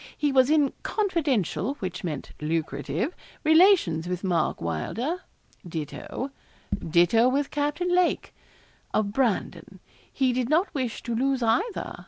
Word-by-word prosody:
He 295 -1 +1
was 260 0 +4
in 300 -3 +3
confidential 285 - 0
which 185 -7 -5
meant 150 -6 -4
lucrative 160 - -2 0.3
relations 315 - +5
with 180 +1 -3
Mark 175 -5 0
Wylder. 230 - -2 0.4
Ditto, 170 - -5 0.5
ditto 175 +9 +4
with 275 +2 0
Captain 295 +5 0
Lake, 360 -1 +1 0.6
of 205 -2 +1
Brandon. 245 -5 -1 0.3
He 260 -2 +1
did 250 0 -1
not 335 +6 +2
wish 255 -6 -3
to 235 - -3
lose 260 +2 +1
either. 365 - 0
250 Hz, 125 wpm, -26 LUFS, 175-295 Hz, 0.6 s, relations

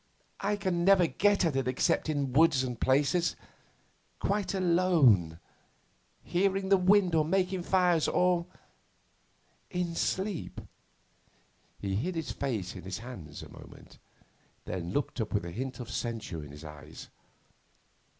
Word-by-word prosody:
I 205 +1 0
can 185 -4 -1
never 190 -1 +6
get 200 +3 +2
at 160 -5 0
it 135 -2 0
except 130 +4 +1
in 140 -4 -1
woods 150 -2 +4
and 125 -3 -5
places, 145 +6 +2 0.8
quite 200 -1 -1
alone, 165 - +3 0.8
hearing 190 +1 0
the 195 - +6
wind 185 -1 +4
or 160 -1 +4
making 185 +2 0
fires, 175 -3 +2
or 180 -1 +2 1.2
in 180 -2 -2
sleep.' 190 +1 -2 1.2
He 100 -1 -3
hid 170 - -2
his 165 -1 -3
face 110 -11 -3
in 90 - -7
his 95 +1 -5
hands 100 -10 -9
a - - -11
moment, - - -14 0.7
then 90 -1 -4
looked 130 +1 -2
up 110 -1 -3
with 100 - 0
a 85 - -6
hint 130 +8 -5
of 120 -1 -7
censure 110 -11 -4
in 75 - -10
his 75 +2 -11
eyes. 75 +1 -11
155 Hz, 140 wpm, -30 LUFS, 110-180 Hz, 1.2 s, never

